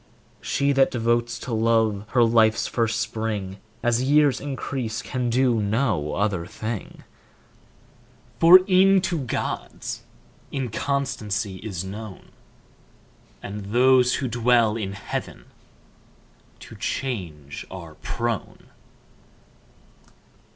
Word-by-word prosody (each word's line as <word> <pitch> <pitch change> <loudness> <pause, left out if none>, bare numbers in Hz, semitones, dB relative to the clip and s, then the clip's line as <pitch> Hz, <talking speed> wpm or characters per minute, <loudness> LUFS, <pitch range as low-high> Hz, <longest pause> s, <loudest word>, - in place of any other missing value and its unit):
She 140 +1 +1
that 135 -1 +4
devotes 120 0 0
to 125 - -6
love 110 -2 +2
her 120 -2 +5
life's 115 -1 +3
first 115 -2 0
spring, 110 -4 -3 0.3
As 120 0 +2
years 145 +1 +3
increase 135 -4 -4
can 125 -2 -2
do 120 -2 +2
no 100 - 0
other 95 -4 -1
thing; 110 0 -6 1.4
For 180 +3 +9
e'en 195 0 +5
to 175 -3 -1
gods 130 -4 -4 0.5
inconstancy 115 -5 -2
is 95 -4 -5
known, 105 0 -9 1.1
And 100 0 -6
those 125 +3 +4
who 135 - -2
dwell 120 -2 +3
in 100 -4 -3
heaven 100 - -6 1.2
to - - -11
change 90 - -4
are 85 -4 -9
prone. 115 +6 -4
115 Hz, 100 wpm, -24 LUFS, 105-130 Hz, 1.4 s, For